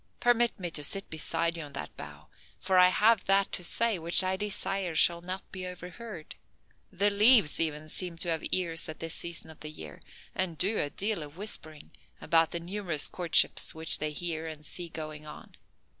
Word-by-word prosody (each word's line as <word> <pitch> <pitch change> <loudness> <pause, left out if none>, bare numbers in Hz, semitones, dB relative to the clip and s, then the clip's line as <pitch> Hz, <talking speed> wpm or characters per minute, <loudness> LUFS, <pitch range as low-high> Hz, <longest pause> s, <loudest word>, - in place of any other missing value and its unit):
Permit 240 -2 +2
me 175 -2 -5
to 150 - -2
sit 195 +7 +2
beside 165 +2 -1
you 165 - -6
on 145 -1 -12
that - - -7
bough, - - -11 0.3
for 185 -1 +2
I 180 - +8
have 210 +3 +3
that 195 0 +2
to 180 - -2
say 225 +2 +2
which 170 +3 +4
I 185 0 0
desire 195 -3 -2
shall 170 +2 +5
not 185 +2 -7
be 185 -2 -6
overheard. 180 0 -9 0.6
The 205 +2 +1
leaves 210 - +5
even 155 -1 -2
seem 175 +1 -2
to 170 +1 -3
have 160 -2 -2
ears 170 -2 0
at 155 - -8
this 165 0 -1
season 170 -1 -3
of 155 - -17
the 155 - -7
year, 75 - -10 0.3
and 180 -4 -2
do 205 +6 +1
a 145 - -1
deal 205 +3 -3
of 150 +2 -11
whispering 155 -7 -4 0.3
about 165 -1 +2
the 170 - -4
numerous 175 -3 -1
courtships 175 -3 +3
which 160 0 +2
they 155 - -2
hear 165 0 -3
and 155 -1 -9
see 175 +2 -4
going 155 -1 -8
on." 150 - -12
170 Hz, 195 wpm, -29 LUFS, 160-195 Hz, 0.6 s, I